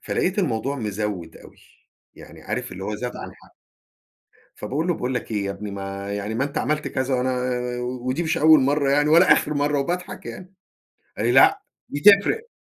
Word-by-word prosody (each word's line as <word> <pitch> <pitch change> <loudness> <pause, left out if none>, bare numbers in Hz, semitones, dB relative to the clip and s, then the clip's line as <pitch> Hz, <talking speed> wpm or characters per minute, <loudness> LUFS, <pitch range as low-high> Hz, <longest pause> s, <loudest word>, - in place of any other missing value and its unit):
فلقيت 190 +3 -1
الموضوع 140 - -1
مزود 105 -7 -4
أوي، - - -16 0.6
يعني - - -14
عارف - - -4
اللي 95 +1 -7
هو 105 +1 -3
زاد 125 +1 -5
عن - - -8
حده. - - -21 1.1
فباقول 140 +10 -3
له: 175 - +2
"باقول 125 -2 -3
لك 125 - -4
إيه 105 -2 -1
يا 100 - -2
ابني 105 +1 -6
ما 100 0 -6
يعني 105 +2 -4
ما 130 - 0
أنت 140 - -3
عملت 150 0 -1
كذا 130 0 -1
وأنا 130 +1 0
آآ 125 -1 -2
ودي 130 +4 -3
مش 160 -1 -1
أول 155 0 +6
مرة 140 +1 +1
يعني 145 +2 +3
ولا 170 +4 +6
آخر 150 - +1
مرة" 145 0 +1
وباضحك 180 +6 -4
يعني 185 +1 -9 0.6
قال - - -1
لي: - - +2
"لأ 390 +1 +5 0.3
دي 145 - -5
تفرق." 205 - +5
130 Hz, 195 wpm, -23 LUFS, 110-155 Hz, 1.1 s, أول